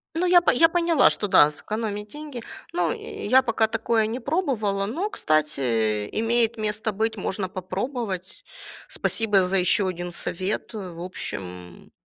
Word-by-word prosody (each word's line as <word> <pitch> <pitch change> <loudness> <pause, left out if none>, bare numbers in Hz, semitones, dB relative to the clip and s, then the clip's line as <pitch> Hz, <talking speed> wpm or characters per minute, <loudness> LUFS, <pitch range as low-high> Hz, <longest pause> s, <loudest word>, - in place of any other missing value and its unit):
Ну, 355 +2 +1
я 350 0 +6
по 345 - +3 0.2
поняла, 335 -3 +4
что 205 - -2
да, 150 -6 +6
сэкономить 210 +5 -4
деньги. 295 -2 -8 0.3
Ну, 175 -2 0
э, - - -7
я 255 +5 +5
пока 225 -3 +1
такое 225 0 +1
не 225 +4 -3
пробовала, 235 - -1
но, 330 - -2
кстати, 155 - 0
э, 110 -5 0
имеет 230 +1 +2
место 215 +1 -1
быть, 220 +2 -1
можно 190 -1 -3
попробовать. 190 - -5 0.4
Спасибо 205 -5 +2
за 195 +1 +1
еще 185 +2 +3
один 175 -1 -4
совет. 185 +6 -3
В 180 -5 -7
общем, 185 - -4 0.4
м - - -25
210 Hz, 155 wpm, -24 LUFS, 185-235 Hz, 0.4 s, я